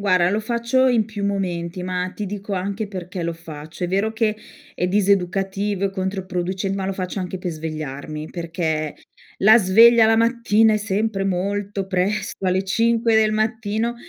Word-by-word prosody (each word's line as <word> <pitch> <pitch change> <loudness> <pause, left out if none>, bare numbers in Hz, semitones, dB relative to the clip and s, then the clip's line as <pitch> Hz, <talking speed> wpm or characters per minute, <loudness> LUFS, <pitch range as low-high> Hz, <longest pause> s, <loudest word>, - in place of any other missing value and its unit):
Guarda 185 -3 +3
lo 205 - +1
faccio 235 +3 +1
in 235 -4 +3
più 210 -2 -5
momenti, 180 -3 -2
ma 180 0 -2
ti 210 - -4
dico 200 +1 -6
anche 200 +3 -3
perché 185 -2 -6
lo 170 - -1
faccio. 160 +1 -10
È 175 - 0
vero 200 +4 0
che, 220 -1 0 0.4
è 180 - -1
diseducativo 195 +1 0
e 195 - -3
controproduce 190 0 -3
ma 195 -1 -2
lo 195 - -1
faccio 185 +1 -4
anche 185 0 -4
per 180 0 -3
svegliarmi. 155 -1 -6
Perché 165 -3 -2 0.4
la 215 +4 +7
sveglia 225 +3 +6
la 225 - +4
mattina 225 -1 +3
è - - +3
sempre 210 -1 -1
molto 195 +1 -2
presto, 190 +1 -1
alle 185 +1 +2
5 230 +3 +2
del 215 -1 +3
mattino, 220 +1 -1
195 Hz, 165 wpm, -22 LUFS, 180-215 Hz, 0.4 s, la